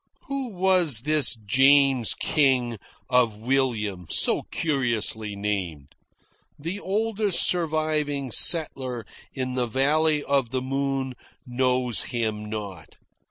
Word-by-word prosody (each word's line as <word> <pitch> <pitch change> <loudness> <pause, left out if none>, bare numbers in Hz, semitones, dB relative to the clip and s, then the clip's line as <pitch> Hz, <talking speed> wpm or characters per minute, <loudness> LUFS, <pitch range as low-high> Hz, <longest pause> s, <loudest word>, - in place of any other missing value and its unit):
Who 275 -1 -4
was 180 - +3
this 150 -1 +3
James 135 +3 +3
King 130 -7 +1 0.3
of 125 -4 +1
William, 110 -7 -1
so - - +3
curiously 115 -8 -1
named? 90 -9 -4 0.6
The 170 +7 -5
oldest 210 -1 0
surviving 155 -5 -1
settler 130 -6 +2 0.3
in 130 -1 -3
the 125 -1 -1
Valley 150 +5 +1
of 140 -4 0
the 130 +1 -3
Moon 135 0 -2 0.3
knows 125 -1 0
him 110 -3 -3
not. 100 -6 -8
130 Hz, 105 wpm, -24 LUFS, 115-150 Hz, 0.6 s, was